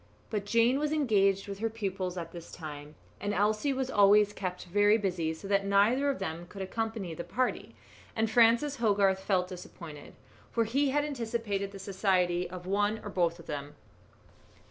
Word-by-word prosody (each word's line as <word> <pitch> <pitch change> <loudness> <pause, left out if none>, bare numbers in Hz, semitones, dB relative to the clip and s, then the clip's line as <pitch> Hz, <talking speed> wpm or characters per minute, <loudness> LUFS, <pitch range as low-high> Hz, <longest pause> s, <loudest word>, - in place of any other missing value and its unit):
But 205 -2 -2
Jane 235 +5 +3
was 300 0 0
engaged 200 -10 +2
with 200 -1 -6
her 225 +1 0
pupils 195 -4 -3
at 165 -1 -5
this 170 -1 -10
time, 150 -2 -8 0.2
and 205 +1 -2
Elsie 215 +7 +1
was 265 -1 -2
always 205 0 +5
kept 185 -3 -5
very 205 +4 +4
busy, 180 -6 -1
so 195 - -9
that 200 0 +2
neither 210 +8 +3
of 275 - 0
them 165 +2 -5
could 195 +1 -7
accompany 220 -3 -3
the 165 - -5
party, 255 +7 -2 0.4
and 225 0 +1
Francis 235 +6 +4
Hogarth 200 -4 +3
felt 185 -2 0
disappointed, 165 -5 -10 0.4
for 230 - +2
he 270 +6 +1
had 290 +2 +1
anticipated 225 -7 -3
the 200 - -9
society 185 -3 0
of 180 0 -8
one 205 +3 +1
or 205 - -6
both 170 -3 +1
of 170 - -13
them. 145 0 -6
200 Hz, 175 wpm, -30 LUFS, 180-225 Hz, 0.4 s, always